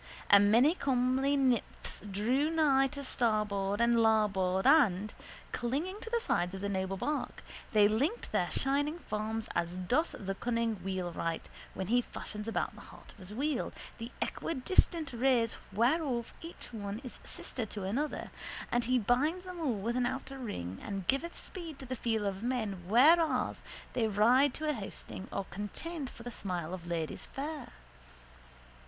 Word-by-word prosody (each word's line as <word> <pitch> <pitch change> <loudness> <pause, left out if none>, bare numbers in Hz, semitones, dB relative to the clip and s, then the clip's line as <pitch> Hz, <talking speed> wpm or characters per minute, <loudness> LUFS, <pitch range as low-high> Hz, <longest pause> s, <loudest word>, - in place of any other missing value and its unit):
A 200 - +10
many 230 +10 +6
comely 265 -1 +2
nymphs 255 -4 0
drew 245 +10 +1
nigh 290 -4 +4
to 280 +1 -6
starboard 210 -5 0
and 235 0 +4
to 235 - +4
larboard 200 -4 +3
and, 215 - +5 0.4
clinging 295 - -2
to - - -6
the 470 0 +2
sides 180 - 0
of 190 - -6
the 200 - -1
noble 190 0 -1
bark, 295 +9 -2 0.3
they 210 -3 +6
linked 275 - 0
their - - +1
shining 290 +4 +1
forms 220 -5 -3
as 170 +1 -1
doth 245 - +1
the 195 -1 -3
cunning 230 +1 0
wheelwright 175 -3 -2 0.3
when 190 - -2
he 240 +6 +3
fashions 210 -2 -6
about 225 - -1
the - - -12
heart - - -13
of - - -19
his 185 +1 -9
wheel 275 +4 -1 0.3
the 230 +2 -6
equidistant 325 0 +1
rays 240 -2 +2 0.2
whereof 240 - +1
each 330 -6 -9
one 205 -1 -4
is 250 - -7
sister 230 -4 -4
to 205 -1 -6
another 255 +11 -2 0.4
and 240 -1 +2
he 255 +1 +3
binds 285 - +1
them 365 -1 -7
all 280 -8 +1
with 225 +4 -2
an 250 -1 +2
outer 270 +1 -5
ring 95 - -5
and 195 -2 -4
giveth 295 - 0
speed 335 -6 -7
to 270 - -8
the 255 0 -3
feet 225 -2 0
of 195 -1 -2
men 220 -7 -2
whenas 310 - +5 0.3
they 225 -2 +2
ride 240 +7 +4
to 310 - -3
a 300 - +2
hosting 195 -4 -7
or 195 - -2
contend 265 - -4
for 235 - -12
the 245 - -5
smile 180 -5 -4
of 175 -2 -6
ladies 165 -2 -3
fair. 290 -1 -5
235 Hz, 165 wpm, -32 LUFS, 200-275 Hz, 0.4 s, A